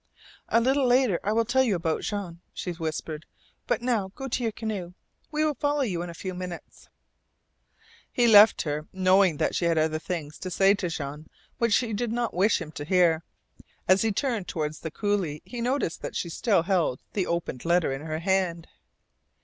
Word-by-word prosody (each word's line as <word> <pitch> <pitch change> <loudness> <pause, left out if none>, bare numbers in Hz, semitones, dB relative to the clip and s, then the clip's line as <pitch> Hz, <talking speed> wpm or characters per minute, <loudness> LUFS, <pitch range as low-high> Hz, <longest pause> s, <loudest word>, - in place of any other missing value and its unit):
"A 230 - +4
little 265 +2 +2
later 245 -7 +3
I 205 - 0
will 230 +1 +2
tell 255 +3 +3
you 235 -7 +2
about 165 -2 -1
Jean," 190 -5 -4
she 180 - -4
whispered. 160 -2 -5 0.4
"But - - 0
now, 220 -6 0
go 270 - -5
to 255 0 -2
your 230 -2 0
canoe. 205 -6 -5 0.3
We 310 0 0
will 305 - +1
follow 290 0 0
you 180 -8 -2
in 175 - -5
a 170 - -8
few 185 +2 -5
minutes." 180 -1 -8 1.2
He 245 - +2
left 215 -2 +7
her, 150 0 -3
knowing 185 -3 +3
that - - 0
she 175 - 0
had 165 -1 +2
other 155 0 +1
things 160 -3 -5
to 185 - -5
say 195 +3 +4
to 190 -3 -2
Jean 150 -1 -6 0.3
which 235 -3 +2
she 225 +1 +2
did 225 +2 -1
not 240 0 -1
wish 195 +5 +3
him 160 -3 -7
to 145 - -6
hear. 170 -1 +3 0.7
As 185 +1 +5
he 225 - +2
turned 225 -4 -1
toward 155 -4 -2
the 160 - -6
coulee 185 -4 -2
he 240 -1 -6
noticed 250 - -1
that - - -6
she 170 - -2
still 195 +1 +1
held 175 -8 +1
the 195 -3 -1
opened 170 -7 -3
letter 170 -4 +2
in 135 - -5
her 155 0 -4
hand. 175 -1 0
185 Hz, 200 wpm, -26 LUFS, 165-225 Hz, 1.2 s, left